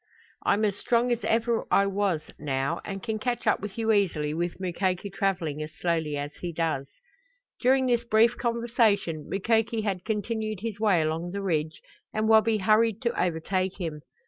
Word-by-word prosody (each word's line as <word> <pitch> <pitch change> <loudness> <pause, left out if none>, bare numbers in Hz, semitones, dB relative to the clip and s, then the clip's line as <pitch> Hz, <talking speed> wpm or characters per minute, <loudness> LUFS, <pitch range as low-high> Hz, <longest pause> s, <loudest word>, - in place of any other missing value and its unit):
I'm 215 +1 +2
as 205 -1 -1
strong 240 +2 +1
as 240 -1 -1
I - - -1
ever 230 0 +1 0.2
was 195 -5 0 0.2
now, 135 -1 -1
and 195 -1 -6
can 220 -2 -2
catch 245 +2 -2
up 215 - +3
with 205 +1 -7
you 225 -1 +1
easily 165 -8 +1
with 175 +2 -3
Mukoki 185 +1 -1
traveling 180 -7 -1
as 155 0 -6
slowly 160 -4 -1
as 145 +1 -4
he 175 - -4
does." 160 -4 -1 0.7
During 260 +1 +4
this 240 -2 +2
brief 230 +1 +4
conversation 230 - 0
Mukoki 225 +3 +1
had 190 -4 -2
continued 215 -1 -2
his 220 -2 -4
way 200 -7 +3
along 160 +3 -2
the 200 +2 -4
ridge 155 -4 -1 0.3
and 215 0 +1
Wabi 220 0 +5
hurried 215 +1 +3
to 235 - 0
overtake 185 +2 -1
him. 160 -4 -4
200 Hz, 170 wpm, -27 LUFS, 170-225 Hz, 0.7 s, Wabi